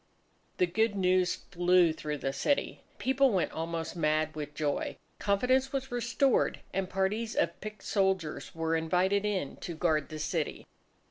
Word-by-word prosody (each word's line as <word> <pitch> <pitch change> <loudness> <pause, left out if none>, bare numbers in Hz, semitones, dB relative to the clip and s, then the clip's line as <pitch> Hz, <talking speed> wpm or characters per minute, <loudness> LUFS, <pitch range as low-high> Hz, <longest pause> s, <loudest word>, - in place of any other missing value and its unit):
The 180 - +4
good 210 +4 +1
news 185 -1 +2
flew 175 -2 +3
through 150 -1 -4
the 135 -1 -2
city. 280 - 0 0.2
People 265 +1 +3
went 185 -8 +1
almost 165 0 -4
mad 155 -1 +1
with 150 -1 -6
joy. 150 -2 -1 0.2
Confidence 255 +7 +2
was 265 -2 -3
restored; 245 +3 +1
and 190 0 -1
parties 200 +4 -1
of 170 - 0
picked 215 0 -7
soldiers 190 -7 0
were 165 0 0
invited 180 +5 +1
in 190 -9 -2
to 170 - -6
guard 155 -3 +1
the 155 - -6
city. 155 0 -2
180 Hz, 150 wpm, -30 LUFS, 160-210 Hz, 0.2 s, The